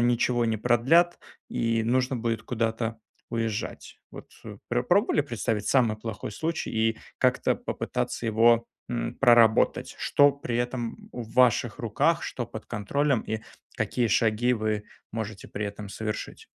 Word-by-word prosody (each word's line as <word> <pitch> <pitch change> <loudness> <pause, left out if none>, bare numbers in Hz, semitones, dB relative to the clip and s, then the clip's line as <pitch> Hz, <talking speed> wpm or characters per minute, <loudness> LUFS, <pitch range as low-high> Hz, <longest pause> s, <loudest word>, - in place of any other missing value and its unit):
ничего 120 0 +2
не 110 -1 0
продлят 135 +10 +3 0.3
и 115 -1 0
нужно 125 +3 +1
будет 115 -1 -2
куда-то 115 -1 -2 0.3
уезжать. 115 -2 -4
Вот - - -11 0.4
пр - - +1
пробовали - - +3
представить 105 -2 -2
самый 120 -5 +3
плохой 110 -1 -6
случай 160 +8 -3
и 110 0 +1 0.2
как-то - - +2
попытаться - - -3
его, 115 +1 +4 0.2
м, 120 - -3
проработать? 120 -4 +4
Что 145 0 +4
при 130 -4 -4
этом 120 - -3
в 115 -2 -7
ваших 125 -3 +3
руках, - - +1
что - - -4
под - - -9
контролем 135 +5 0
и 110 0 -3 0.4
какие 120 -2 0
шаги 115 +3 +2
вы 110 -2 -1 0.3
можете 110 -2 -5
при 105 +1 -3
этом 100 0 -7
совершить? 105 +1 -5
115 Hz, 135 wpm, -27 LUFS, 110-125 Hz, 0.4 s, его